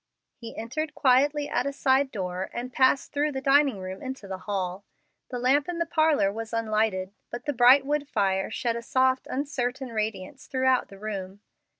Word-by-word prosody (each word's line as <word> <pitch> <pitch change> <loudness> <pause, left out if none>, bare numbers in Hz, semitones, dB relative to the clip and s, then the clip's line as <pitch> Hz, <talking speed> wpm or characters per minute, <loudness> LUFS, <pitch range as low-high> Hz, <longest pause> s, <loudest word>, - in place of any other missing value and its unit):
He 230 -1 -10
entered 300 +7 -4
quietly 285 +2 +3
at 250 - -1
a - - -1
side 270 0 +2
door 185 -4 -4
and 250 +1 -5
passed 260 +1 +3
through 295 +1 0
the 265 - -2
dining 275 -3 +3
room 185 0 -7
into 260 -6 -6
the 190 -1 -5
hall. 190 -1 -2 0.5
The 250 - -4
lamp 275 +5 +2
in 350 - -3
the 335 - 0
parlor 310 -11 +2
was 225 +1 -6
unlighted, 215 -4 0 0.2
but 240 0 -7
the 290 - -1
bright 255 +2 +6
wood 290 0 -1
fire 195 -5 0
shed 230 +1 -2
a 235 - -4
soft, 260 +2 +1
uncertain 260 -2 -2
radiance 215 +3 -4
throughout 260 -1 +2
the 195 - -13
room. 200 -1 -6
250 Hz, 185 wpm, -26 LUFS, 205-275 Hz, 0.5 s, bright